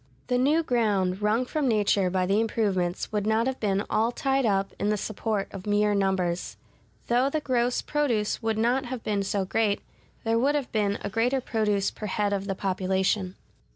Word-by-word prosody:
The 250 0 +2
new 300 +6 +3
ground 205 -8 +1
wrung 215 +4 +2
from 295 +2 -1
nature 205 -4 +2
by 185 0 0
the 200 +4 +2
improvements 195 -6 -1
would 210 -1 -1
not 220 +1 +2
have 265 0 -2
been 200 -1 0
all 225 +2 +1
tied 270 0 +1
up 195 -1 0
in 205 - 0
the 210 - +1
support 210 0 -2
of 195 +1 -8
mere 210 0 +2
numbers. 190 -3 0 0.5
Though 245 +3 +2
the 310 - -1
gross 250 -4 0
produce 245 -9 0
would 225 -1 -1
not 245 +4 +1
have 245 -1 -5
been 205 -2 0
so 195 0 -1
great, 205 +1 +1 0.4
there 225 0 +1
would 280 +4 +2
have 285 -4 -2
been 205 -2 +1
a 200 - -2
greater 245 +6 +1
produce 210 -5 0
per 215 - -6
head 205 +1 0
of 200 0 -2
the 195 - -1
population. 190 0 0
210 Hz, 190 wpm, -26 LUFS, 195-240 Hz, 0.5 s, new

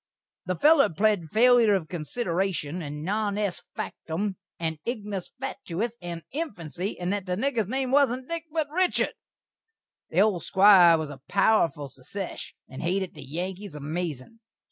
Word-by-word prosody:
The 185 - 0
feller 300 - +5
pled 195 -1 +1
failur 235 -3 +5
of 165 -4 -7
konsiderashun, 175 - -2
and 150 -1 -6
non 205 +1 0
est 205 -3 -2
faktum, 185 +4 -3 0.2
and 160 -2 -2
ignis 210 -6 -4
fatuis, 240 -5 -3
and 170 -1 -6
infansy, 195 - -4
and 180 +2 -1
that 200 -2 -3
the 180 - 0
nigger's 230 -1 0
name 260 +2 -1
wasn't 260 -2 +3
Dik, 335 -1 -4
but 315 -1 0
Richard. 365 +2 +2 1.0
The 175 - +3
old 200 -5 +2
Squire 190 -4 +7
was 155 -2 -4
a 135 -2 -11
powerful 185 -8 +2
sesesh, 140 +9 -7
and 130 - -8
hated 185 +2 -1
the - - -11
Yankees 180 +6 -5
amazin'. 155 - -5
190 Hz, 145 wpm, -26 LUFS, 165-225 Hz, 1.0 s, Squire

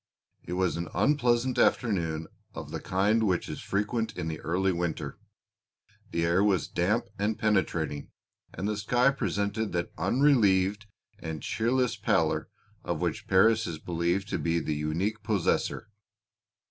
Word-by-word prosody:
It - - -6
was 90 -1 0
an 85 0 -3
unpleasant 120 - +2
afternoon 85 -8 +1 0.3
of - - -7
the - - -3
kind 100 +4 +1
which 95 -5 +1
is - - -6
frequent 110 +2 -2
in 80 - -2
the 80 - -5
early 95 +3 0
winter: 85 -2 -3 0.9
the 85 0 0
air 85 +4 +3
was 100 -5 +2
damp 105 +7 0
and 105 +1 0
penetrating, 85 -8 0 0.4
and 100 - -4
the 105 -1 -1
sky 125 +5 +3
presented 100 -4 -2
that 85 0 -2
unrelieved 105 -7 +3 0.3
and 80 -2 -6
cheerless 125 +2 0
pallor - - +1 0.3
of - - -2
which - - -2
Paris 110 +4 +4
is 80 - -4
believed 85 +4 -1
to - - -1
be 85 0 0
the 80 -1 -1
unique 85 +9 -2
possessor. 105 +1 0
100 Hz, 145 wpm, -28 LUFS, 85-110 Hz, 0.9 s, Paris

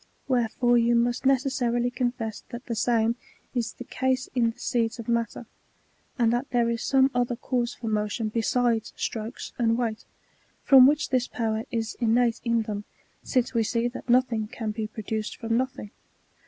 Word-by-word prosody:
Wherefore 240 -1 +2
you 235 0 +3
must 240 +2 +1
necessarily 250 -3 +1
confess 240 -4 -3
that 240 0 -8
the 235 - -3
same 230 0 +1 0.4
is 240 -3 -2
the - - -9
case 260 +1 -1
in 240 -3 +2
the 230 - -8
seeds 230 -1 -1
of 230 - -8
matter, 235 0 -1 0.7
and 235 -2 +3
that 245 +3 -1
there 235 -1 +2
is 230 0 -2
some 270 0 +3
other 245 0 0
cause 245 -1 -2
for 235 - -9
motion 215 +1 -1
besides 230 0 0
strokes 225 +2 -5
and 230 -1 +2
weight, 230 -3 -2 0.6
from 265 -2 +8
which 300 +1 +1
this 255 -1 +1
power 220 -1 -2
is 225 -2 -3
innate 235 0 +2
in 235 -1 +1
them, 210 -1 -4 0.4
since 255 -1 0
we 230 - +2
see 230 +2 0
that 245 - -10
nothing 240 -3 +3
can 220 0 -4
be 215 0 -3
produced 220 0 -4
from 230 -1 -1
nothing. 260 -4 -2
235 Hz, 170 wpm, -26 LUFS, 225-250 Hz, 0.7 s, from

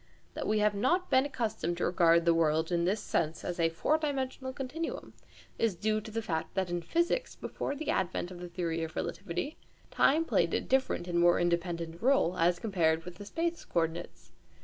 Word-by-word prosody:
That - - -4
we 215 - +2
have 210 0 +3
not 345 - +1
been 260 +1 +5
accustomed 220 - -2
to - - 0
regard 170 -1 +4
the 170 - +5
world 160 0 +2
in 170 -1 +1
this 200 +4 +1
sense 155 +1 -1
as 175 0 -3
a 165 -1 +3
four 295 - +1
dimensional 265 -3 -2
continuum 270 +5 -5 0.5
is 225 -5 +2
due 215 +4 0
to 220 - -9
the 225 +1 -3
fact 160 -3 -3
that 190 -2 0
in 175 0 -1
physics, 345 - 0
before 280 - -4
the 310 +1 -2
advent 185 -1 -1
of 180 - -9
the 175 0 -7
theory 165 -2 -2
of 160 0 -6
relativity, 195 - -3 0.3
time 315 +4 +3
played - - +2
a - - +2
different 260 -9 0
and 170 -1 0
more 175 0 +5
independent 170 -1 -1
role, 260 -8 +3
as 175 +1 +3
compared 165 -6 +1
with 180 -1 -9
the 205 - -9
space 335 +9 -2
coordinates. 160 - -3
180 Hz, 195 wpm, -31 LUFS, 170-260 Hz, 0.5 s, been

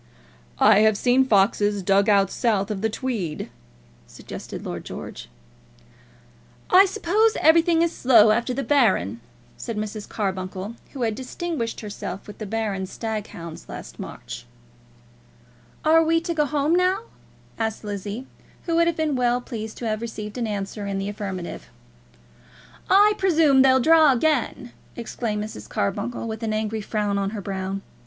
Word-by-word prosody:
"I 205 - +6
have 215 -1 +4
seen 255 +3 +3
foxes 205 -1 +2
dug 195 +3 +3
out 195 -2 +4
south 215 -4 0
of 195 -2 -3
the 220 - +1
Tweed," 215 - -4 0.6
suggested - - -9
Lord - - -5
George. - - -8 1.4
"I 375 +2 +8
suppose 425 +3 +1
everything 330 +1 +5
is 340 - -1
slow 225 -4 +6
after 235 +3 +1
the 275 +2 -2
Baron," 190 - +2 0.4
said 230 -2 -5
Mrs. 210 0 -5
Carbuncle, 190 0 -3 0.2
who 265 -4 -3
had 225 -2 +1
distinguished 260 0 -4
herself 200 -3 -6
with 210 - -11
the 215 - -5
Baron's 200 -3 -2
stag 220 -2 -4
hounds 165 -1 -10
last - - -9
March. - - -8 1.4
"Are 325 +1 +6
we 330 +1 +3
to 340 0 -2
go 300 -2 +2
home 295 +2 +1
now?" 365 +3 +2 0.6
asked 220 -1 -2
Lizzie, 205 +4 -5 0.4
who 335 -1 0
would 335 0 +4
have 340 - 0
been 310 -3 0
well 245 -1 +2
pleased 220 -3 -7
to 235 - -4
have 215 0 -2
received 215 -2 -6
an 235 - -1
answer 200 0 -4
in 200 -1 -2
the 195 +1 -2
affirmative. 195 -4 -6 1.2
"I 415 +2 +6
presume 320 -8 +4
they'll 260 0 +5
draw 315 0 +6
again," 255 -2 0 0.2
exclaimed 220 -2 -3
Mrs. 105 - -8
Carbuncle, 225 - -2
with 220 0 -5
an 220 -1 -1
angry 215 0 -2
frown 205 -1 -1
on 195 0 -1
her - - -4
brow. 195 0 -4
220 Hz, 155 wpm, -24 LUFS, 200-275 Hz, 1.4 s, I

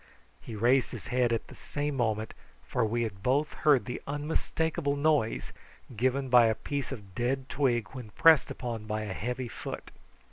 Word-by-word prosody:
He 110 - -8
raised 120 +5 +3
his 115 -8 -8
head 125 -1 +2
at 115 - 0
the - - -12
same 145 0 -3
moment, 110 -3 -1 0.3
for 115 - -1
we 115 +2 0
had 100 -4 -5
both 140 +7 +1
heard 145 -5 +3
the 125 - -5
unmistakable 150 +1 -1
noise 145 -6 +1 0.4
given 130 +4 +1
by 120 -2 +7
a 110 - +1
piece 140 +3 -4
of 100 -7 -8
dead 130 +5 -1
twig 120 -6 +1
when 125 -4 -8
pressed 160 +6 +5
upon 115 -4 -5
by 110 0 -2
a 105 -3 -4
heavy 125 +5 -3
foot. - - -7
125 Hz, 175 wpm, -29 LUFS, 110-140 Hz, 0.4 s, by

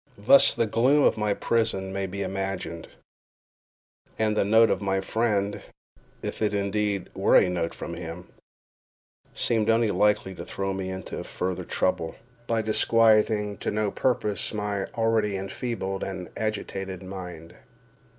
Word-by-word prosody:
Thus 105 +7 +6
the 115 - +2
gloom 130 +7 +3
of - - +4
my 105 -2 0
prison 105 -5 0
may 95 0 -2
be 100 +2 -4
imagined, 95 -3 -4 1.3
and 110 -1 +1
the - - +3
note 110 +3 +5
of - - 0
my 95 -1 0
friend, 105 0 0 0.6
if - - -5
indeed 105 -1 0
it - - -25
were - - +3
a - - +6
note 85 -2 -2
from 85 - -6
him, 85 +1 -7 1.1
seemed 115 -2 +1
only 115 -1 +3
likely 105 -2 +2
to - - -8
throw 95 0 -3
me 95 -1 -4
into 95 -1 -6
further 90 0 -3
trouble, 80 -3 -1 0.3
by 115 -1 +1
disquieting 110 -2 +3
to - - -2
no 105 -1 0
purpose 115 -5 0
my 105 -2 -2
already 110 -3 +1
enfeebled 95 0 -4
and 95 -2 -6
agitated 95 -3 -4
mind. 90 -3 -8
100 Hz, 140 wpm, -26 LUFS, 95-110 Hz, 1.3 s, Thus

